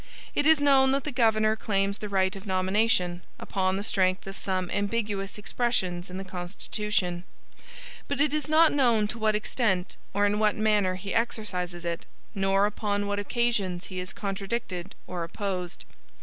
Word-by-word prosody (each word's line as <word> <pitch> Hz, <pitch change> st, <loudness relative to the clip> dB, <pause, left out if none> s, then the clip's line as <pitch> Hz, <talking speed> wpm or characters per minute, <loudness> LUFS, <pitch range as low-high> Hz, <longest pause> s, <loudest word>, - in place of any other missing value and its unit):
It 290 Hz, -, +2 dB
is 320 Hz, -1 st, +6 dB
known 270 Hz, -2 st, +5 dB
that 275 Hz, -1 st, +1 dB
the 300 Hz, -, -3 dB
governor 220 Hz, -3 st, +3 dB
claims 200 Hz, -2 st, 0 dB
the 210 Hz, -, -5 dB
right 190 Hz, 0 st, +1 dB
of 195 Hz, +2 st, -9 dB
nomination, 185 Hz, -1 st, +1 dB, 0.2 s
upon 190 Hz, -1 st, -1 dB
the 200 Hz, -, -2 dB
strength 185 Hz, -3 st, +1 dB
of 195 Hz, 0 st, -7 dB
some 185 Hz, -2 st, -2 dB
ambiguous 205 Hz, -1 st, -1 dB
expressions 190 Hz, -5 st, -1 dB
in 180 Hz, -, -6 dB
the 195 Hz, -, -4 dB
constitution; 180 Hz, 0 st, -2 dB, 0.8 s
but 285 Hz, -1 st, -2 dB
it 295 Hz, 0 st, +3 dB
is 305 Hz, -2 st, -1 dB
not 315 Hz, +1 st, +6 dB
known 235 Hz, -7 st, +3 dB
to 235 Hz, -, -5 dB
what 215 Hz, -1 st, +2 dB
extent, 210 Hz, -4 st, 0 dB
or 205 Hz, +1 st, +2 dB
in 205 Hz, +1 st, +1 dB
what 215 Hz, -1 st, +3 dB
manner 210 Hz, -4 st, +2 dB
he 195 Hz, +1 st, -5 dB
exercises 180 Hz, -7 st, -2 dB
it; 170 Hz, -1 st, -3 dB, 0.3 s
nor 195 Hz, 0 st, +2 dB
upon 205 Hz, -1 st, -1 dB
what 205 Hz, 0 st, -1 dB
occasions 205 Hz, -5 st, 0 dB
he 185 Hz, -, -3 dB
is 180 Hz, +1 st, -3 dB
contradicted 195 Hz, -2 st, -4 dB
or 175 Hz, -2 st, -4 dB
opposed. 185 Hz, 0 st, -4 dB
205 Hz, 165 wpm, -27 LUFS, 185-220 Hz, 0.8 s, is